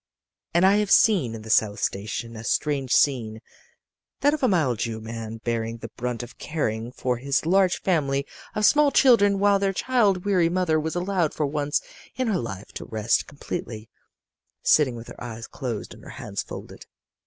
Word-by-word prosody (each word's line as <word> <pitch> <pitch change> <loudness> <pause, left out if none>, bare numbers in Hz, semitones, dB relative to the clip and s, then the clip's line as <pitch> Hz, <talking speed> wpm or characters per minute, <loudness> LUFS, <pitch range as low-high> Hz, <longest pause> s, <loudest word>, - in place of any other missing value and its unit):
"And 175 +2 +5
I 195 +2 +5
have 210 -1 0
seen 170 - +4
in 110 - -9
the 110 - -5
South 105 -2 +3
Station 110 +4 -3
a 110 - -8
strange 135 +1 -1
scene: 115 -7 +2 0.8
that 290 +1 +4
of 310 - -2
a 260 - +4
mild 150 - +1
Jew 115 -2 -2
man 115 0 -6
bearing 115 -1 -2
the - - -8
brunt 125 -1 -3
of 120 - -12
caring 120 -7 -3
for 125 -1 -2
his 140 +4 -1
large 185 +1 +3
family 140 -6 +1 0.3
of 210 - +2
small 295 +3 +5
children, 230 -8 +5
while 200 0 +3
their 195 0 0
child 205 -5 +1
weary 185 -5 +3
mother 175 -3 +1
was 160 +2 -3
allowed 180 -3 0
for 150 - 0
once 145 0 -1 0.3
in 255 -3 -1
her 200 - +1
life 100 -4 -6
to - - -7
rest 110 +1 0
completely, 125 -6 -7 0.7
sitting 140 -5 +4
with 115 0 -9
her - - -10
eyes 115 -1 -7
closed 120 -5 -5
and - - -15
her - - -12
hands - - -5
folded. - - -10
140 Hz, 185 wpm, -25 LUFS, 115-190 Hz, 0.8 s, And